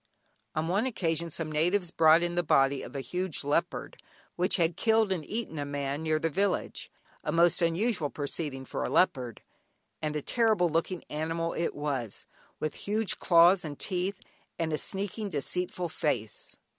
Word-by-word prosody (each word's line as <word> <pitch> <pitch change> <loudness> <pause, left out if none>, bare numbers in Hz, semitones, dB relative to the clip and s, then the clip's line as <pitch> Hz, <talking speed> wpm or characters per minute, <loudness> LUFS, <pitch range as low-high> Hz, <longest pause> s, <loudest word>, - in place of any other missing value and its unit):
On 155 +1 0
one 200 +8 +1
occasion 170 -7 -1
some 160 0 -3
natives 175 +4 +1
brought 160 +1 +6
in 175 0 -1
the 175 - +2
body 135 -3 +3
of - - -9
a 135 - -2
huge 180 +2 -2
leopard 145 +1 -1 0.3
which 180 +1 +2
had 170 -2 +2
killed 220 -2 +3
and 175 -5 -1
eaten 215 -5 -4
a - - -1
man 145 0 -3
near 155 -1 +1
their 160 +1 -1
village 195 +3 -1 0.3
(a - - -1
most 170 +2 +4
unusual 170 -1 +1
proceeding 140 -2 -3
for - - -3
a - - -2
leopard), 125 - +1 0.6
and 150 -1 -2
a 150 - -1
terrible 220 -7 +3
looking 165 +2 -1
animal 165 +2 -2
it 165 - -2
was, 135 -7 -3 0.3
with 155 - -2
huge 215 +1 -1
claws 175 +2 +6
and 145 -3 -6
teeth, 185 +1 -2 0.4
and 160 -2 -1
a - - +1
sneaking 200 +2 0
deceitful 180 +3 -2
face. 120 -9 -2
165 Hz, 170 wpm, -29 LUFS, 150-185 Hz, 0.6 s, brought